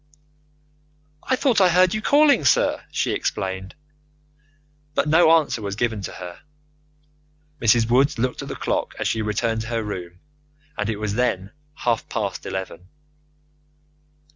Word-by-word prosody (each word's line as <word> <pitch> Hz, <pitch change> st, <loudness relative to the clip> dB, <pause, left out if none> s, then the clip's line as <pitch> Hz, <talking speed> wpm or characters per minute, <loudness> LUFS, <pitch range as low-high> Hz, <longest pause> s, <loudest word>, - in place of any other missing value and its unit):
"I 260 Hz, -, 0 dB
thought 255 Hz, -5 st, +2 dB
I 185 Hz, -, +6 dB
heard 180 Hz, +1 st, +4 dB
you 215 Hz, -, -2 dB
calling, 285 Hz, -, +4 dB
sir," 135 Hz, -, +2 dB
she -, -, -1 dB
explained, 95 Hz, 0 st, -3 dB, 1.2 s
but -, -, +1 dB
no 160 Hz, +2 st, +5 dB
answer 155 Hz, -8 st, +2 dB
was 100 Hz, -1 st, -4 dB
given 115 Hz, -2 st, -1 dB
to -, -, -6 dB
her. 90 Hz, 0 st, -9 dB, 1.2 s
Mrs. 115 Hz, 0 st, +4 dB
Woods 130 Hz, +4 st, +3 dB
looked 125 Hz, +2 st, -1 dB
at -, -, -7 dB
the -, -, -5 dB
clock -, -, -2 dB
as -, -, -1 dB
she 110 Hz, -, 0 dB
returned 110 Hz, +1 st, -1 dB
to 110 Hz, -, -6 dB
her 115 Hz, -1 st, -2 dB
room, 90 Hz, -4 st, -7 dB, 0.6 s
and 105 Hz, +1 st, -2 dB
it 110 Hz, -, -2 dB
was 105 Hz, -1 st, -2 dB
then 105 Hz, -4 st, -1 dB, 0.2 s
half 120 Hz, -6 st, -1 dB
past 105 Hz, -4 st, -3 dB
eleven. 95 Hz, -1 st, -6 dB
115 Hz, 145 wpm, -22 LUFS, 100-150 Hz, 1.2 s, I